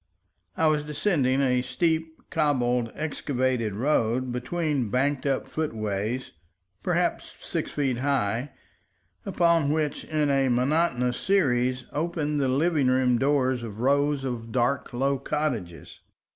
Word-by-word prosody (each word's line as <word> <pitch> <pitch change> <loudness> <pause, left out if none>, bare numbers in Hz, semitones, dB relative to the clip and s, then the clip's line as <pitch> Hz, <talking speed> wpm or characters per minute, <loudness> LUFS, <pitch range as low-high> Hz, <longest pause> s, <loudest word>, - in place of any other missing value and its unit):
I 160 - +2
was 155 -1 +2
descending 145 -4 +1
a 125 -2 +2
steep, 160 +5 -2
cobbled, 125 -6 +1
excavated 130 -7 -1
road 125 0 +1
between 135 0 -1
banked 140 +4 0
up 135 -1 0
footways, 110 -4 -3 0.5
perhaps - - -1
six - - -3
feet 135 -4 0
high, 130 -2 0 0.8
upon 170 -4 +3
which, 150 -1 -1
in 150 -2 0
a 135 -1 +2
monotonous 125 -1 +1
series, 130 -9 +1
opened 150 -2 -1
the 135 - +2
living 145 +1 +2
room 130 -2 +3
doors 130 -2 +2
of 110 -2 -7
rows 140 +1 +2
of 120 -3 -4
dark, 125 +4 0
low 135 +2 0
cottages. 125 - -3
135 Hz, 120 wpm, -26 LUFS, 125-150 Hz, 0.8 s, upon